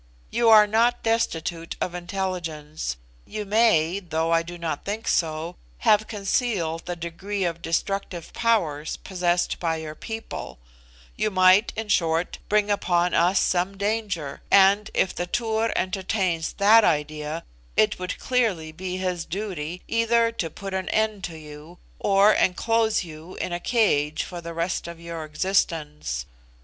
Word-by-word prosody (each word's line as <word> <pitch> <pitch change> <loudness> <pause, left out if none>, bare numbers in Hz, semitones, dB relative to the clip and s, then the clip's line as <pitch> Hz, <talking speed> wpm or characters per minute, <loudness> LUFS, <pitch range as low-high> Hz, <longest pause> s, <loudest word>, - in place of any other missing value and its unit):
You 235 -1 +3
are 215 -1 +9
not 230 +3 +2
destitute 170 -7 -1
of 180 - -2
intelligence; 170 - -4 0.3
you 210 - -6
may 200 -5 +3
(though 165 -3 -1
I 165 0 +4
do 175 +1 -8
not 165 -4 -3
think 215 +3 -4
so) 160 +1 0 0.2
have 210 - +3
concealed 195 -6 -1
the 175 - -2
degree 180 +4 -4
of 170 -1 -2
destructive 175 0 -2
powers 165 -11 0
possessed 175 -2 -1
by 165 -2 0
your 160 -1 -6
people; 220 - -7 0.6
you - - 0
might, 185 +2 +5
in 220 0 -4
short, 165 -3 +1
bring 210 0 +2
upon 180 -3 +1
us 180 +3 +4
some 185 +2 0
danger; 200 -8 -2
and 200 +2 +5
if 190 - +2
the 175 - -3
Tur 225 +1 0
entertains 185 -3 -1
that 215 +3 +6
idea, 150 0 -1 0.3
it 110 - +3
would 180 0 -4
clearly 215 -11 0
be 185 +3 -5
his 180 -2 -2
duty, 180 -3 -5
either 230 0 +2
to 205 -8 -3
put 195 +4 -7
an 190 0 -2
end 215 -3 0
to 165 -2 -7
you, 155 +2 -11 0.2
or 200 +1 +5
enclose 220 +3 +2
you 160 +1 -10
in 175 - -3
a 175 - -2
cage 165 -10 +1
for 175 -2 -7
the 170 0 -7
rest 170 +1 -2
of 170 -1 -8
your 170 -1 -6
existence. 150 - -1
180 Hz, 150 wpm, -25 LUFS, 165-210 Hz, 0.6 s, are